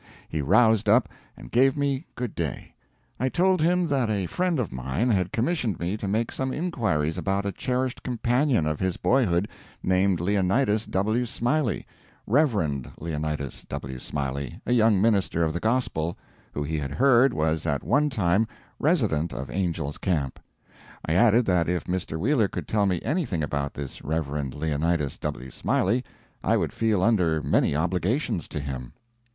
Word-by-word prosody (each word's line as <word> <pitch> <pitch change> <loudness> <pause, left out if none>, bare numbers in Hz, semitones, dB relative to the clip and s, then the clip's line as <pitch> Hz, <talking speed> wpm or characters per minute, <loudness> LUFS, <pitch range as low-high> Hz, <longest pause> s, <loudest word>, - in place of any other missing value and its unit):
He 80 - -2
roused 110 - +4
up, 115 +2 +4 0.3
and - - -12
gave 135 +3 +4
me 140 +1 -1
good 125 -4 -4
day. 80 -6 -4 0.5
I 130 +2 +1
told 185 +3 +2
him 180 +2 +3
that 130 -5 +1
a 100 -3 0
friend 180 - 0
of 125 -6 -2
mine 65 - -1
had 95 -4 +1
commissioned 120 - 0
me 85 +4 -1
to 105 - -4
make 110 +4 0
some 130 0 -2
inquiries 110 - -1
about 100 0 -1
a 100 - 0
cherished 125 +5 -2
companion 125 - +1
of 75 -1 -1
his 95 -1 -1
boyhood 105 -8 +2 0.4
named 95 -1 +2
Leonidas 105 +4 +1
W. 110 +6 +1
Smiley 120 +1 0 0.4
Rev. 100 - +1
Leonidas 75 -3 -4
W. 65 -1 -5
Smiley, 70 0 -4
a 125 - +1
young 110 -4 +4
minister 100 -5 +2
of 80 -1 0
the 85 - -2
Gospel, 110 -8 0 0.3
who 75 - -3
he 80 +1 -2
had 70 -1 -4
heard 135 0 +5
was 80 -2 0
at 70 -2 0
one 150 +1 +2
time 105 -3 +2 0.3
resident 110 - +1
of 65 0 -6
Angel's 85 -6 -2
Camp. 75 -8 -1 0.7
I 80 - 0
added 115 +5 +5
that 85 -3 +2
if 90 -1 0
Mr. 90 -3 -3
Wheeler 115 - +2
could - - -6
tell 105 -2 +2
me 90 -3 +1
anything 135 - -1
about 70 -1 -2
this 70 -2 -6
Rev. 80 0 -1 0.3
Leonidas 75 0 -1
W. 65 +1 -5
Smiley, 115 - +1 0.4
I - - +3
would - - -1
feel 110 -5 +1
under 90 -8 +3
many - - +2
obligations 90 - 0
to 75 - -4
him. 65 -4 -6
95 Hz, 165 wpm, -26 LUFS, 80-120 Hz, 0.7 s, heard